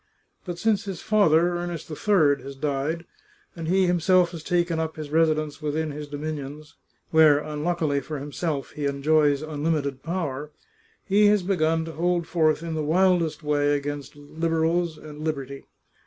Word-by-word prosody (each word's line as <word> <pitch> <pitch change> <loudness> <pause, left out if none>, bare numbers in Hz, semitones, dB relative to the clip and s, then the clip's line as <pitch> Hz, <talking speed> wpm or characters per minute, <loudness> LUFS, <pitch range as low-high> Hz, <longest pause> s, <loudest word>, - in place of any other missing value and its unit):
But 175 -2 -5
since 215 +1 +1
his 195 -4 -5
father, 175 -5 +3
Ernest 175 -2 -5
III, 155 -5 +2
has 135 +1 -8
died, 150 +4 -2 0.5
and 165 -2 -5
he 190 +2 +3
himself 180 0 +3
has 165 -3 -7
taken 170 -1 0
up 160 -1 -2
his 155 -2 -7
resi 160 0 +3
dence 155 0 -5
within 155 +1 -2
his 150 +1 -7
dominions 150 0 -6 0.2
— - - -43
where, 155 -2 +6
unluckily 150 0 -1
for 150 +3 -6
himself, 145 +1 -3
he 145 -1 -3
enjoys 145 +1 +2
unlimited 150 -3 -2
power 150 -4 -3 0.3
— 450 0 -36
he 205 +1 +4
has 205 -2 +3
begun 165 -4 +1
to 165 - -6
hold 175 +1 0
forth 160 -2 +1
in 165 -1 -4
the 155 - -1
wildest 170 -1 +2
way 145 -1 +2
against 145 -1 -5
Liberals 165 +2 -1
and 150 -1 -11
liberty. 140 -3 -4
155 Hz, 165 wpm, -25 LUFS, 145-175 Hz, 0.5 s, where